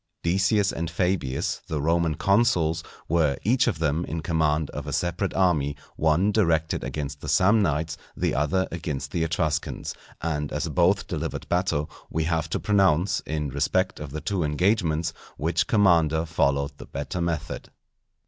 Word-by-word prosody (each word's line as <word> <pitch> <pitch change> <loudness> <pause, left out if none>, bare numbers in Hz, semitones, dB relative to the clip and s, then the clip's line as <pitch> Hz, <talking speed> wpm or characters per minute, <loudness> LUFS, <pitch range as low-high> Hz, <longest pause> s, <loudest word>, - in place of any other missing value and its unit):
_ - - -51
Decius 100 +3 +2
and 85 0 -3
Fabius, 85 -6 -1
the 80 - -2
Roman 80 +1 +1
consuls, 85 -5 +2 0.2
were 80 -4 +2
each 125 +5 +3
of 105 -9 +1
them 80 +1 0
in 80 +2 -4
command 80 -2 +1
of - - -6
a - - -3
separate 90 +3 -1
army, 75 -7 +2 0.2
one 80 +6 +2
directed 85 -6 +1
against 70 -1 -4
the - - -7
Samnites, 80 -4 +2 0.2
the - - 0
other 75 +7 +1
against 75 -5 -4
the 85 - -1
Etruscans: 80 -1 -1 0.3
and 75 -3 -2
as - - -2
both - - +2
delivered - - -4
battle, 85 -4 +1 0.2
we 80 - -1
have 80 0 -1
to - - -1
pronounce, 95 -3 +3
in 75 -2 -2
respect 95 +8 0
of 75 -1 -6
the 75 +3 -5
two 95 -4 -1
engagements, 80 0 +1 0.2
which 80 +1 0
commander 85 -6 +3
followed 70 -3 0
the - - -9
better 75 +6 -4
method. 80 -2 -3
80 Hz, 160 wpm, -25 LUFS, 75-90 Hz, 0.3 s, each